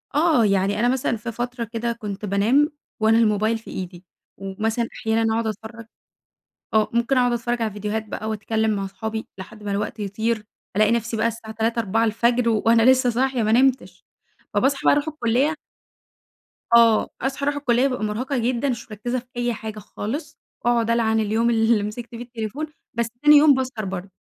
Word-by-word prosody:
آه 300 -6 +4
يعني 195 0 +1
أنا 240 - +3
مثلًا 250 -2 0
في 230 +2 -6
فترة 240 +1 -4
كده 230 +1 -3
كنت 210 -3 -6
بانام 225 - +2 0.3
وأنا 220 +1 +4
الموبايل 215 0 +2
في 225 - -13
إيدي، 180 0 -7 0.3
ومثلًا 220 +4 -2
أحيانًا 225 0 0
أقعد 225 0 0
أتفرج 220 +1 -7 0.9
آه 215 -1 +4
ممكن 235 +3 +1
أقعد 245 -1 +3
أتفرج 240 0 -1
على 220 - 0
فيديوهات 210 +2 -3
بقى 215 +1 -5
وأتكلم 220 +1 -1
مع 195 - -2
أصحابي 220 +3 -5
لحد 210 +3 -10
ما 205 - -4
الوقت 205 +2 -3
يطير، 220 +2 -2 0.3
ألاقي 215 +1 +4
نفسي 230 0 -1
بقى 220 - +1
الساعة 230 -1 -5
3:00 225 +2 -1
4:00 225 +1 +1
الفجر 235 +2 +2
وأنا 225 +1 +3
لسه 260 -1 +3
صاحية 255 +1 0
ما 215 0 +1
نمتش 260 +2 +2 0.5
فباصحى 275 +1 +2
بقى - - +6
أروح 290 +2 -1
الكلية 285 0 +1 1.2
آه 230 -2 +5
أصحى 270 +2 -2
أروح 290 0 +1
الكلية 255 -2 +2
بابقى 250 -5 -3
مرهقة 250 +7 -2
جدًا 245 +3 0
مش 235 -2 -5
مركزة 240 +4 -3
في 240 - -16
أي 240 0 0
حاجة 215 -1 -7
خالص، 220 - -6 0.3
واقعد 235 -1 +2
ألعن 225 -1 +2
اليوم 220 +2 +1
اللي 225 -2 +3
مسكت 225 +3 -6
فيه 230 - -7
التليفون، 240 +5 -5 0.3
بس 235 -1 -1 0.2
تاني 300 0 +8
يوم 290 0 +7
باسهر 255 -5 -2
برضه. 190 0 -5
230 Hz, 180 wpm, -23 LUFS, 215-245 Hz, 1.2 s, تاني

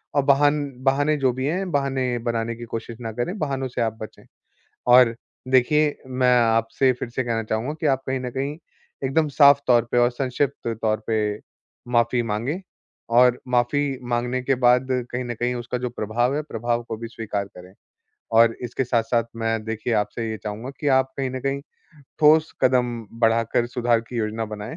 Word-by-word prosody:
और 145 - +3
बाहन 145 +1 +4 0.2
बहाने 145 +3 +2
जो 130 -2 +2
भी 130 +1 -3
हैं, 180 +3 -2
बहाने 135 -3 0
बनाने 115 0 -2
की 120 - -8
कोशिश 115 0 -5
ना 115 -1 -4
करें, 125 - -3
बहानों 135 -4 -2
से 120 -1 -4
आप 110 -1 -1
बचें। 110 - -9 0.7
और 125 -2 +7 0.3
देखिए 145 +4 +3
मैं 125 -1 +2
आपसे 115 +3 +2
फिर 120 -1 -6
से 130 +1 -2
कहना 115 -2 -1
चाहूँगा 110 +7 -2
कि - - -2
आप 135 -1 +2
कहीं 130 0 -1
न 125 - -4
कहीं, 140 +4 -3 0.5
एकदम 150 +4 +1
साफ़ 140 0 +6
तौर 120 -2 +5
पे 125 - +1
और 120 0 +4
संक्षिप्त 130 0 -2
तौर 110 -1 +1
पे 110 -1 +1 0.8
माफी 120 +1 +3
माँगे 115 - -2 0.6
और 125 -1 +5
माफी 125 +4 +2 0.3
माँगने 120 +1 -1
के 135 0 +1
बाद 125 +2 +4 0.2
कहीं 125 +1 -2
न 120 - -3
कहीं 120 +2 -1
उसका 120 +1 -4
जो 125 0 -2
प्रभाव 120 +4 -1
है, 150 - 0
प्रभाव 120 -3 -2
को 115 -1 -6
भी 115 0 -6
स्वीकार 105 -3 -4
करें, 90 +1 -13 0.6
और 115 0 +5
इसके 125 +2 -2
साथ-साथ 115 -1 +1
मैं 115 -1 -1
देखिए 115 +2 -3
आपसे 110 +2 -1
ये 110 - -3
चाहूँगा 110 +5 -5
कि 145 - 0
आप 130 0 +1
कहीं 130 -1 -1
न 130 - -5
कहीं, 140 +1 -2 0.6
ठोस 155 +1 +5
कदम 125 -2 +3 0.3
बढ़ाकर 115 +1 +2
सुधार 120 -1 +1
की 125 - -6
योजना 110 0 -2
बनाएँ। 105 +1 -7
120 Hz, 185 wpm, -23 LUFS, 115-135 Hz, 0.8 s, और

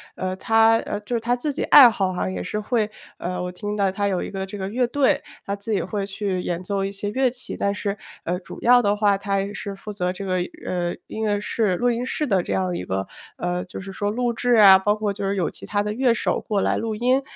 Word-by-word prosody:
呃， 185 0 -3
他 225 +1 +4
呃， 205 - -3
就 210 +4 -6
是 235 - +2
他 240 +2 +1
自 270 +5 -2
己 285 - -3
爱 270 -4 +9
好 200 -4 0
啊 180 - -2
也 95 -1 -4
是 150 - -4
会 215 0 0 0.3
呃， 180 0 -3
我 180 - -4
听 205 +3 -4
到 200 -2 +1
他 200 +1 -1
有 185 -3 -1
一 - - -6
个 190 -1 -3
这 195 +2 -8
个 190 -1 -4
乐 245 +3 +1
队， 275 +1 +2 0.2
他 200 - -2
自 200 +2 -7
己 205 - +2
也 - - -2
会 205 -2 -3
去 195 -2 -2
演 175 0 -3
奏 195 +1 -1
一 - - -2
些 205 +1 -3
乐 260 +3 +2
器。 250 +1 -6
但 200 - 0
是， 205 0 -3 0.3
呃， 180 +1 -2
主 185 - -11
要 245 +1 +6
的 205 -1 +2
话， 205 -1 +3
他 195 0 -1
也 200 +1 -4
是 200 -2 -5
负 210 +2 -8
责 180 -3 -2
这 195 - -7
个， 185 -1 -1 0.3
呃， 175 -1 -2
音 220 - -6
乐 205 -1 +1
室 210 -3 0
录 245 +6 +1
音 240 +1 -2
室 300 - -1
的 195 -9 +2
这 - - -3
样 185 -1 0
一 90 - -4
个 95 +1 -2 0.3
呃， 180 0 -2
就 185 - -8
是 195 - -8
说 205 +1 -2
录 240 +2 0
制 245 +1 +1
啊， 195 -3 +9
包 205 +2 +2
括 215 -1 -1
就 200 0 -3
是 200 - 0
有 180 -4 0
其 - - -9
他 205 -1 0
乐 230 +4 +2
手 - - 0
过 205 -3 -1
来 - - +1
录 225 -1 -2
音。 250 +4 +2
205 Hz, 290 characters per minute, -23 LUFS, 190-225 Hz, 0.3 s, 爱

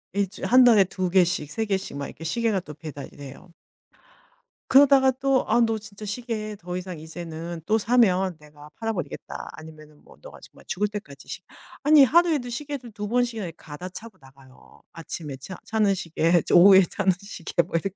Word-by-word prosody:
1 200 -2 +1
주일 200 - -7
1 255 +1 +6
달에 225 -5 +6
2 185 -1 -3
개씩 175 -5 +1
3 220 +7 -2
개씩 195 -7 -3
막 140 - -4
이렇게 165 - -11
시계가 215 +4 0
또 150 -4 -10
배달이 150 -3 -9
돼요. 140 +5 -12 1.2
그러다가 270 -1 +6
또 270 -1 +2
"아 - - +3
너 225 -1 +2
진짜 210 0 -11
시계 215 -1 -4
더 180 -1 -6
이상 180 -3 -7
이제는 165 +1 -7
또 220 +1 +2
사면 195 -6 +2
내가 150 0 -15
팔아 225 -1 -2
버리겠다." 175 - -6
아니면은 155 -1 -14
뭐 - - -18
"너가 - - -12
정말 - - -17
죽을 210 +2 -1
때까지 200 -10 -9
시" - - -7 0.4
아니 300 -1 +7
하루에도 305 -2 +3
시계를 265 -1 -6
2 210 0 -6
번씩이나 235 -4 -1
이 165 - -7
갈아 160 +4 -9
차고 215 +1 -11
나가요. 135 -1 -19
아침에 160 -3 -7
차 160 +8 -9
차는 215 -3 +2
시계 170 -1 +1
저 - - +2
오후에 190 +2 +8
차는 195 -2 +1
시계 175 -4 -2
뭐 170 - -7
이렇게. 195 +4 -2
195 Hz, 350 characters per minute, -24 LUFS, 165-225 Hz, 1.2 s, 오후에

